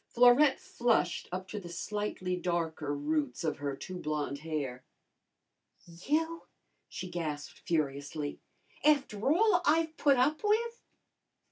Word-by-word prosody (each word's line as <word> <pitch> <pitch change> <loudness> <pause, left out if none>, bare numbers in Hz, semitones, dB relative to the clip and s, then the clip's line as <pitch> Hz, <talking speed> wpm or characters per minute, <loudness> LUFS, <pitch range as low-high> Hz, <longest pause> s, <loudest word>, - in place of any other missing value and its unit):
Florette 250 +4 +6
flushed 235 -7 0
up 185 +1 -4
to 210 - -5
the 175 -3 -9
slightly 185 0 -3
darker 165 -4 -2
roots 145 -2 -1
of 155 -3 -1
her 140 -1 -2
too 185 +6 -7
blonde 150 -3 -2
hair. 145 -5 -4 1.0
"You?" 305 - -2 0.4
she 185 - -6
gasped 155 -5 -5
furiously. 145 -1 -2 0.4
"After 280 -6 +3
all 360 +2 +4
I've 320 +1 +2
put 280 -2 +4
up 290 +8 +2
with!" 460 +3 +1
180 Hz, 120 wpm, -31 LUFS, -, 1.0 s, Florette